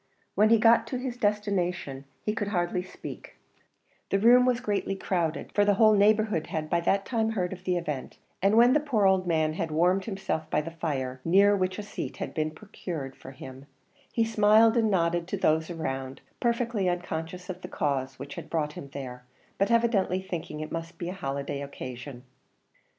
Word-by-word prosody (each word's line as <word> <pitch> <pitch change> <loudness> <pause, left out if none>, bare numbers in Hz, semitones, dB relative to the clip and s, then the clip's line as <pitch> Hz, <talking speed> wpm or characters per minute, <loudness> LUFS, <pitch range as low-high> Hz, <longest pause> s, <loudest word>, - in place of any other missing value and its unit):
When 215 +1 +4
he 230 - +6
got 230 +1 +5
to 255 - -3
his 250 -1 -4
destination 190 - -1 0.2
he 210 - 0
could 210 -2 -2
hardly 180 -2 0
speak; 180 - -10 0.7
the 195 - +2
room 245 +4 +6
was 245 -1 +2
greatly 205 -3 -1
crowded, 170 -4 -2
for 205 - +4
the 205 0 +3
whole 215 +1 +6
neighbourhood 210 -4 +3
had 155 -1 -4
by 170 - +3
that 195 +3 +1
time 225 -2 0
heard 180 -3 -1
of 185 0 -11
the 180 -1 +1
event; 150 -6 -4 0.2
and 200 +3 +3
when 240 +2 +7
the 300 - +4
poor 255 -9 +1
old 190 -1 +3
man 155 -2 +1
had 165 0 -3
warmed 180 +5 +2
himself 195 -6 -3
by - - +2
the 160 +2 -4
fire, 135 -6 -3
near 200 +4 +5
which 185 -1 -1
a 210 - -4
seat 205 - -6
had - - -5
been 155 -2 0
procured 155 -5 -7
for - - -11
him, 135 +1 -11 0.4
he 230 - +2
smiled 220 +1 +5
and 225 -2 +3
nodded 170 -3 +1
to 200 - -3
those 160 -3 +2
around, 135 -5 -4 0.2
perfectly 235 -5 0
unconscious 175 0 -4
of 185 -1 -6
the 180 - -6
cause 135 -6 -2
which 140 +2 -8
had - - -8
brought 150 -2 -1
him 140 - -9
there, 125 -3 -7 0.4
but 195 - +2
evidently 225 -6 +2
thinking 170 -5 -5
it 155 - -6
must 165 +1 -5
be 175 - -4
holiday 140 -6 -4
occasion. 130 -2 -8
180 Hz, 190 wpm, -28 LUFS, 155-210 Hz, 0.7 s, when